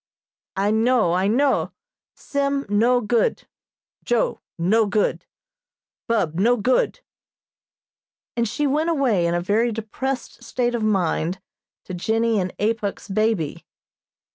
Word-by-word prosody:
"I 200 +2 +1
know, 225 -4 +3
I 185 +2 +1
know, 265 +6 +1 0.4
Sim 280 -1 -1
no 235 +5 +3
good 235 - +1 0.6
Joe - - 0 0.2
no 210 +6 +2
good 210 +1 0 0.8
Bub 185 -8 0
no 240 +5 +4
good," 255 - +1 1.3
and 235 -1 +1
she 295 +8 -1
went 300 +4 +1
away 245 - +2
in 170 - 0
a 175 - 0
very 220 +6 +1
depressed 235 +4 -4
state 245 -1 -1
of 235 - -1
mind 185 -4 0 0.4
to 185 - -8
Jennie 225 +4 +1
and 185 -1 -2
Apuk's 210 -1 -2
baby. 205 -6 0
225 Hz, 120 wpm, -22 LUFS, 195-250 Hz, 1.3 s, no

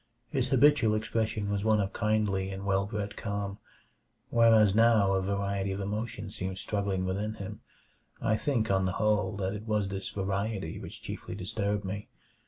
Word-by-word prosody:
His - - 0
habitual 135 -5 +5
expression 110 -1 -1
was 100 -1 -1
one 110 -1 +4
of 100 -1 -1
kindly 105 -3 +1
and 95 0 -6
well 100 0 +1
bred 105 -1 -4
calm, 100 -1 -3 0.7
whereas 110 -3 +6
now 110 -3 +5
a 95 - +2
variety 100 0 -1
of 95 - -3
emotions 105 +1 -4
seemed 95 0 -3
struggling 100 -2 -1
within 105 +4 -2
him. 100 -3 -7 0.6
I 110 - +2
think, 115 -2 0
on 95 -1 +2
the 90 - -1
whole, 105 -2 +1
that 95 0 -1
it 105 +2 -7
was 105 -2 +1
this 95 0 -4
variety 100 -2 -2
which - - -9
chiefly - - -6
disturbed 100 +1 -2
me. 100 +2 -4
100 Hz, 170 wpm, -30 LUFS, 95-110 Hz, 0.7 s, whereas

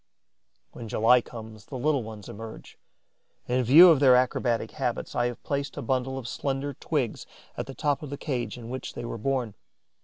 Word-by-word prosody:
When 115 - -8
July 115 +4 +4
comes, 110 -3 -10
the 130 - -7
little 145 +1 +1
ones 110 -2 -9
emerge. 110 +1 -10 0.7
In 125 +1 +1
view 165 +9 +9
of 155 - +4
their 130 -3 +7
acrobatic 125 -2 +1
habits, - - -3
I 120 - +1
have 120 - -7
placed 140 0 -3
a - - -4
bundle 130 0 -1
of 125 -3 -6
slender 140 +3 -2
twigs 135 -4 -2 0.3
at - - -4
the 135 - -8
top 145 -2 0
of 150 - -7
the 140 - -5
cage 125 -7 -3
in 120 0 -8
which 130 - -6
they - - -5
were 115 - -5
born. 125 -2 -1
125 Hz, 190 wpm, -27 LUFS, 115-140 Hz, 0.7 s, view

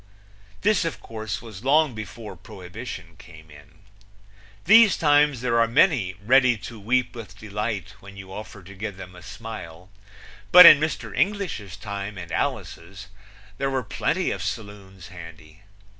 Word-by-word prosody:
This 210 -1 +2
of 165 -5 -4
course 110 -1 -6
was 110 -3 -11
long 150 +1 +3
before 110 0 -8
Prohibition 95 -3 -10
came 80 -2 -15
in. 75 +5 -18 0.8
These 220 0 +6
times 145 -4 +3
there 120 -2 +1
are 115 - +4
many 115 - +2
ready 125 0 +4
to 110 +2 -10
weep 120 +4 0
with 115 -3 -10
delight 105 -2 -4
when 100 0 -14
you 95 -1 -10
offer 105 -1 -9
to 100 +3 -12
give 100 0 -6
them 90 -2 -11
a 90 - -13
smile; 90 -4 -10 0.6
but 180 +1 +11
in 150 - +10
Mr. 155 0 -3
English's 185 - -2
time 100 -1 -6
and 85 -2 -8
Alice's 95 +4 -4 0.5
there 135 0 0
were 130 -1 -2
plenty 105 - -1
of - - -4
saloons 100 -4 -7
handy. 85 -2 -13
105 Hz, 150 wpm, -24 LUFS, 95-125 Hz, 0.8 s, but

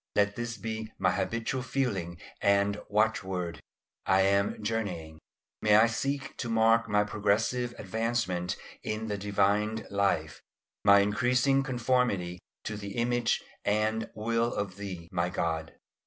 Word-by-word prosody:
Let 105 0 +3
this 120 -1 -4
be 110 +1 -5
my - - +2
habitual 115 +3 -1
feeling 105 -10 -2 0.2
and 100 +1 +2
watchword, 95 -5 0 0.5
"I 95 0 +5
am 100 +2 +2
journeying." 90 -8 -3 0.4
May 105 -1 +5
I 110 +1 +7
seek 135 +4 -2
to 120 - -3
mark 115 0 +3
my 105 0 +3
progressive 105 +4 0
advancement 105 -4 -1 0.2
in 110 +1 -3
the 105 - -1
divine 105 +2 +1
life, 100 0 0 0.4
my 100 0 +7
increasing 125 +6 +2
conformity 120 -9 0 0.2
to 110 - -4
the 100 -1 -7
image 120 0 +1 0.2
and 110 +2 0
will 115 +2 0
of 100 -2 -3
Thee, 95 -5 -6
my 90 -1 0
God. 80 -2 -2
105 Hz, 130 wpm, -29 LUFS, 100-115 Hz, 0.5 s, I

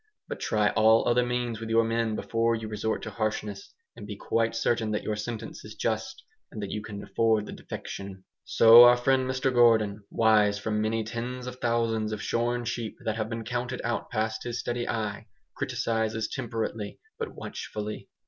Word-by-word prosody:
But - - -5
try 105 -1 +2
all 110 +1 +4
other 120 +1 +4
means 120 -2 -2
with 115 -1 -6
your 115 0 +4
men 115 -1 0
before 115 +1 0
you 110 -1 -5
resort 110 +1 -2
to - - -5
harshness; 105 -2 -3 0.2
and 105 - -9
be 105 - -5
quite 115 +2 0
certain 115 -1 +1
that 105 -1 -1
your 110 - -1
sentence 110 +1 -6
is - - -10
just, - - -2 0.3
and - - -7
that 100 -2 -4
you 105 - -3
can 105 -1 -7
afford 110 +1 +1
the - - -8
defection. 95 -1 -7 0.2
So 115 +1 +9
our 120 0 +7
friend 130 +1 +2
Mr 130 0 0
Gordon, 110 -4 +4
wise 105 -2 +4
from 105 +1 -1
many 110 +1 0
tens 120 +3 -5
of 125 0 -6
thousands 115 -2 0
of 110 - -3
shorn 120 +1 0
sheep 115 -2 -4
that 110 -1 -1
have 110 -1 -2
been 115 -1 -4
counted 125 +2 -3
out 120 0 -2
past 110 -1 -1
his 120 0 -3
steady 120 0 -3
eye, 105 -2 -3 0.3
criticises 110 -1 -1
temperately, 115 -4 -4 0.2
but 455 - -4
watchfully. 105 0 -6
115 Hz, 185 wpm, -27 LUFS, 110-120 Hz, 0.3 s, So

